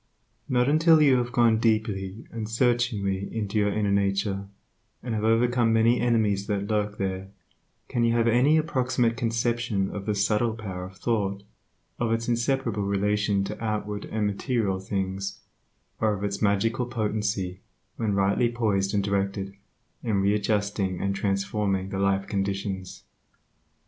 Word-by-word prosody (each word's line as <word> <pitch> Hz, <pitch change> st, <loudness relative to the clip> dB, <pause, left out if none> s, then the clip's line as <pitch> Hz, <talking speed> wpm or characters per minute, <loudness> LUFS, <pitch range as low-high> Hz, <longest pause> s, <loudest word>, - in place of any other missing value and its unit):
Not 125 Hz, 0 st, +2 dB
until 160 Hz, +2 st, +5 dB
you 140 Hz, -4 st, +5 dB
have 120 Hz, 0 st, -1 dB
gone 115 Hz, -2 st, +4 dB
deeply 110 Hz, -2 st, -1 dB
and 110 Hz, -2 st, -5 dB
searchingly 115 Hz, -5 st, 0 dB
into 105 Hz, -1 st, -1 dB
your 105 Hz, 0 st, +2 dB
inner 105 Hz, -1 st, 0 dB
nature, 100 Hz, 0 st, 0 dB, 0.6 s
and 120 Hz, -1 st, -3 dB
have 110 Hz, -1 st, -1 dB
overcome 115 Hz, +1 st, +3 dB
many 115 Hz, +2 st, +3 dB
enemies 110 Hz, -4 st, +1 dB
that 100 Hz, -2 st, -1 dB
lurk 105 Hz, -1 st, -1 dB
there, 95 Hz, -1 st, -3 dB, 0.6 s
can 120 Hz, -, 0 dB
you 115 Hz, 0 st, +3 dB
have 115 Hz, 0 st, +2 dB
any 125 Hz, +7 st, +4 dB
approximate 125 Hz, -6 st, +1 dB
conception 115 Hz, -3 st, 0 dB
of 100 Hz, 0 st, -6 dB
the 105 Hz, -, +1 dB
subtle 105 Hz, +3 st, +1 dB
power 95 Hz, -5 st, -6 dB
of 95 Hz, +1 st, -12 dB
thought, 100 Hz, -4 st, -1 dB, 0.6 s
of 120 Hz, -1 st, 0 dB
its 115 Hz, 0 st, -1 dB
inseparable 120 Hz, -2 st, 0 dB
relation 100 Hz, 0 st, +1 dB
to 100 Hz, -, -6 dB
outward 105 Hz, -2 st, -2 dB
and 110 Hz, -1 st, -2 dB
material 105 Hz, -1 st, -1 dB
things, 95 Hz, 0 st, -3 dB, 0.6 s
or 110 Hz, -1 st, +2 dB
of 100 Hz, -, -6 dB
its 100 Hz, -1 st, -2 dB
magical 115 Hz, +4 st, +1 dB
potency, 105 Hz, -5 st, -2 dB, 0.4 s
when 105 Hz, -3 st, 0 dB
rightly 100 Hz, +4 st, +2 dB
poised 105 Hz, -4 st, 0 dB
and 100 Hz, -, +2 dB
directed, 100 Hz, 0 st, -1 dB, 0.5 s
in 105 Hz, -4 st, 0 dB
readjusting 100 Hz, -2 st, 0 dB
and 100 Hz, 0 st, -1 dB
transforming 100 Hz, -1 st, -1 dB
the 95 Hz, -, -3 dB
life 100 Hz, 0 st, +1 dB
conditions. 95 Hz, -1 st, -3 dB
105 Hz, 145 wpm, -26 LUFS, 100-115 Hz, 0.6 s, until